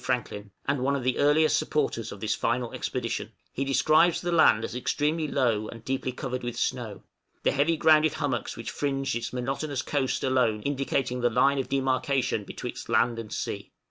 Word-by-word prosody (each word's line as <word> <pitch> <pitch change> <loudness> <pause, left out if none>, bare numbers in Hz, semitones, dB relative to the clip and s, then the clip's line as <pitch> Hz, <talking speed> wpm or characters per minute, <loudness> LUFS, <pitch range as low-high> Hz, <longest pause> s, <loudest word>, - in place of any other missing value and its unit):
Franklin, 105 -5 -2 0.2
and 140 0 +1
one 135 +2 +1
of 135 - -3
the 130 0 0
earliest 155 +2 +4
supporters 145 -7 -1
of 100 - -8
this 110 +1 0
final 120 0 -1
expedition - - -3 0.2
he 135 - -1
describes 155 +6 +4
the 175 - -2
land 135 -9 +5
as - - -6
extremely 150 +5 0
low 115 -7 +1
and 115 0 -10
deeply 130 -1 -1
covered 125 0 -4
with 120 -1 -5
snow, 115 -5 -2 0.4
the - - +3
heavy 150 +4 +2
grounded 155 -1 +5
hummocks - - -2
which - - -5
fringed 135 -1 -1
its 120 - -3
monotonous 135 +3 -3
coast 135 -3 -1
alone 125 -5 +1
indicating 135 -2 -1
the 120 - +3
line 140 +4 +3
of 135 - -3
demarcation 130 -3 0
betwixt - - -7
land 120 -1 +2
and 110 -2 -7
sea. - - -4
130 Hz, 180 wpm, -27 LUFS, 120-145 Hz, 0.4 s, land